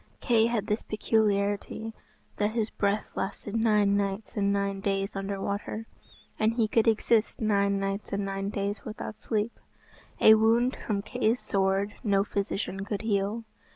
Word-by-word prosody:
Kay 230 -2 +3
had 230 -3 -1
this 210 0 -1
peculiarity, 210 0 0 0.4
that 210 +1 0
his 225 -2 0
breath 205 +1 -1
lasted 205 +2 -4
nine 210 -3 +3
nights 200 +1 -2
and 200 -1 +2
nine 200 -1 0
days 195 0 -1
under 195 0 -3
water, 205 +3 -3 0.5
and 220 +1 +3
he 230 -2 +2
could 225 +1 +2
exist 225 0 +2
nine 200 -2 +2
nights 195 +1 -3
and 200 0 -1
nine 195 0 -3
days 200 0 -3
without 215 -1 -7
sleep. 220 0 -2 0.6
A 220 - +9
wound 230 +4 +3
from 200 -2 -3
Kay's 245 +1 0
sword 195 +1 +1
no 200 -3 +3
physician 200 -1 -3
could 205 +1 -4
heal. 210 +1 0
205 Hz, 155 wpm, -28 LUFS, 200-220 Hz, 0.6 s, A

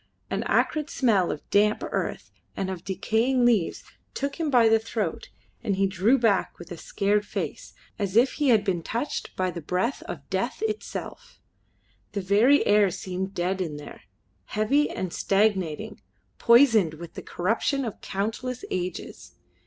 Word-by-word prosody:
An - - 0
acrid 305 -1 +1
smell 210 -9 +2
of 145 - -7
damp 210 +1 +3
earth - - -3 0.3
and 190 -1 -2
of 180 -2 -6
decaying 235 +6 +1
leaves 220 -8 +2 0.3
took 280 +3 -3
him 320 -2 0
by 245 -4 +5
the 225 0 +5
throat, 215 -6 -3 0.3
and 200 - 0
he 195 +1 +2
drew 195 +7 +3
back 225 -6 +1
with 175 +1 -12
a 175 - -6
scared 205 +5 0
face, - - -5 0.2
as 200 -1 -2
if 250 +3 +5
he 290 -3 0
had 220 -4 +5
been 185 -4 -1
touched 235 - -4
by 185 -1 0
the 170 - -6
breath 185 - -1
of - - -7
Death - - -2
itself. 435 -1 -5 0.7
The 200 - -2
very 210 +9 +4
air 205 -1 +5
seemed 190 +2 -5
dead 185 +2 -1
in 155 -5 -3
there 150 - -10 0.4
heavy 270 - +1
and 185 -2 -4
stagnating, 195 -6 0 0.4
poisoned 230 - +5
with 170 +1 -10
the - - -7
corruption 230 +9 -1
of 220 - -6
countless 225 +6 -3
ages. 180 -1 -5
205 Hz, 160 wpm, -26 LUFS, 185-240 Hz, 0.7 s, by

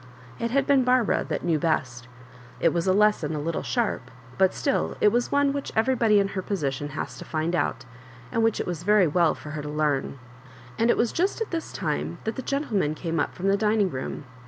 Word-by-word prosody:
It 235 - -1
had 275 +3 +1
been 275 -2 +4
Barbara 250 -3 +2
that - - -2
knew 165 -3 +2
best. 130 -6 -1 0.5
It 165 - +3
was 170 +1 -1
a - - +5
lesson 200 -6 +2
a - - -2
little 165 +2 -2
sharp, 220 - -1 0.3
but 190 -1 +5
still 280 - -1
it 210 - +5
was 240 +3 0
one 285 -1 +3
which 280 -1 -4
every 230 +4 +3
body 220 -4 +4
in 195 0 +1
her 190 - -3
position 145 -7 -2
has 130 0 -5
to - - -7
find 160 +2 -2
out, 135 -5 -1 0.5
and 230 - +1
which 225 -1 +2
it - - -1
was 175 -2 -4
very 205 +1 +4
well 170 +1 +2
for 150 - -9
her 155 -1 -4
to 150 - -6
learn. 150 -2 -1 0.6
And 230 +1 +3
it - - +4
was 235 - +1
just 370 +6 0
at 450 - -3
this 330 -2 -3
time - - -3
that 220 - -3
the - - -4
gentle 275 -3 -2
men 155 -5 0
came 165 0 -3
up 145 - -1
from 185 +2 -2
the 195 - +4
dining 210 -2 +2
room. 130 +2 -5
190 Hz, 230 wpm, -25 LUFS, 155-235 Hz, 0.6 s, a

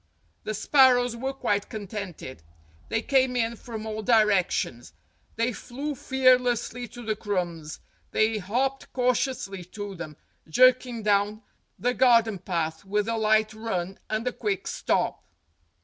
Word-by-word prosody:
The 215 - -2
sparrows 245 +1 +4
were 265 +3 -3
quite 205 -7 -1
contented. 200 - -7 0.5
They 225 0 0
came 260 -2 +2
in 235 -1 0
from 220 -1 -7
all 220 0 -4
directions; 200 - +2 0.4
they 230 +2 0
flew 275 +7 -5
fearlessly 250 -2 +2
to 240 +2 -10
the 215 -1 0
crumbs; 175 -7 -3 0.3
they 215 0 +1
hopped 255 +8 -2
cautiously 250 -6 0
to 205 +2 -7
them, 160 -4 -8 0.3
jerking 250 +3 +4
down 205 +1 +1 0.3
the 245 +1 0
gar 240 -1 +6
den 215 -4 -5
path 165 -3 -3
with 205 +2 -1
a 230 - 0
light 215 0 +2
run 195 -4 -4
and 220 +3 -2
a - - +1
quick 205 -4 -2
stop. - - -1
220 Hz, 135 wpm, -26 LUFS, 200-245 Hz, 0.5 s, gar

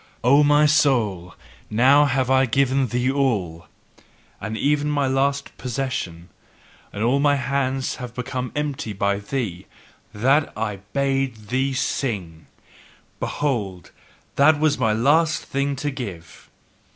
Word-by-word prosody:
O 140 +5 +5
my 145 +1 +4
soul, 115 - +1 0.3
now 135 +7 +5
have 130 -2 0
I 130 0 +4
given 135 +2 +1
thee 125 +3 0
all, 100 -12 -1 0.7
and 110 +2 -5
even 145 +2 +1
my 145 -1 +1
last 140 +1 0
possession, 115 -10 -4 0.6
and 105 - -4
all 125 +4 +2
my 145 0 +3
hands 135 0 -1
have 125 -2 -8
become 125 0 -4
empty 145 -6 -3
by 100 0 0
thee: 100 -5 -4 0.4
THAT 135 +8 +1
I 105 -2 -2 0.2
BADE 135 -6 -1
THEE 135 +2 0
SING, 95 - -3 0.7
behold, 105 - -3 0.5
that 145 +2 +5
was 155 -3 +2
my 110 -4 +2
last 150 +8 +2
thing 140 +1 -1
to 145 +2 -3
give! 100 -11 -8
130 Hz, 125 wpm, -22 LUFS, 110-140 Hz, 0.7 s, O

